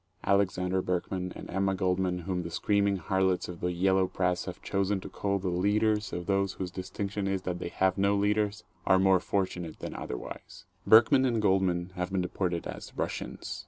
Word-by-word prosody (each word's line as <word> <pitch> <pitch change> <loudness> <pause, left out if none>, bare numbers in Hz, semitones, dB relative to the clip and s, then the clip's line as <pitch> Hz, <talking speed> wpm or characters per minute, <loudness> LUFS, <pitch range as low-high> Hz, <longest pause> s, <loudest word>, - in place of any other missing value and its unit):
Alexander 95 -1 +1
Berkman 90 0 -2
and - - -8
Emma 95 +1 +1
Goldman 90 -1 0
whom 90 0 -2
the 85 - -5
screaming 100 +3 +1
harlots 95 +1 0
of 85 -2 -8
the 90 - -1
yellow 95 +1 +2
press 90 -1 -1
have - - -6
chosen 100 0 0
to - - -8
call 100 -1 -1
the 95 -1 -2
"leaders" 105 +4 +1
of 90 0 -4
those 100 -1 +1
whose 90 -2 -5
distinction 100 +2 -4
is 95 -1 -1
that 90 -1 -3
they 85 - -4
have 95 +1 +1
no 100 +1 +3
leaders, 105 +1 +1 0.2
are 95 - +6
more 95 0 +4
fortunate 90 -3 -2
than - - -6
otherwise. 60 - -7 0.2
Berkman 120 +5 +7
and 120 -4 +1
Goldman 95 -3 +1
have 90 0 -3
been 95 -1 +1
deported 90 -1 -2
as - - -8
"Russians." - - -4
95 Hz, 185 wpm, -29 LUFS, 90-100 Hz, 0.2 s, Berkman